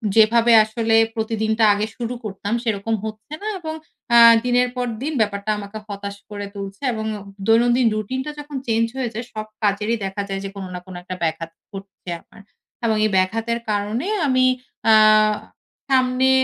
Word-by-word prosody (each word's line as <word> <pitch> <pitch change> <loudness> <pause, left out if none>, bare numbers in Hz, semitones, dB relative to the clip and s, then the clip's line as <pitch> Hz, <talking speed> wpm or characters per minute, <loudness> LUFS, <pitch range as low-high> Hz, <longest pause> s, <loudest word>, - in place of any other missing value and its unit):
যেভাবে 230 +2 +5
আসলে 225 +1 0 0.2
প্রতিদিনটা 220 0 0
আগে 210 +1 -1
শুরু 240 0 -4
করতাম 205 +1 -4
সেরকম 225 -1 -1
হচ্ছে 220 +6 -7
না 425 - -5
এবং 315 -2 -5 0.4
অ্যা 235 0 +7 0.2
দিনের 245 0 +3
পর 250 0 -1 0.2
দিন 310 - -2
ব্যাপারটা 205 0 -1
আমাকে 205 +1 -7
হতাশ 200 0 -6
করে 205 -1 -5
তুলছে 195 +4 -7
এবং 220 -1 -4 0.4
দৈনন্দিন 240 +2 +4
রুটিনটা 260 +7 -3
যখন 295 0 -8
চেঞ্জ 225 0 +2
হয়ে 250 -3 -2
যায় 230 +3 -5
সব 215 0 -4 0.2
কাজেরই 210 +3 +1
দেখা 195 +1 -3
যায় 195 0 -3
যে - - -4
কোনো 195 -2 -6
না 180 - -4
কোনো 185 -1 -9
একটা 185 0 -6
ব্যাঘাত 160 0 -2 0.2
ঘটছে 195 -2 -10
আমার। - - -18 0.4
এবং 220 -1 +2
এই - - +2
ব্যাঘাতের 225 +5 0
কারণে 210 - -1 0.2
আমি 255 -1 +3 0.5
আ - - +8 1.0
সামনে 255 0 +3
220 Hz, 165 wpm, -21 LUFS, 200-240 Hz, 1.0 s, আ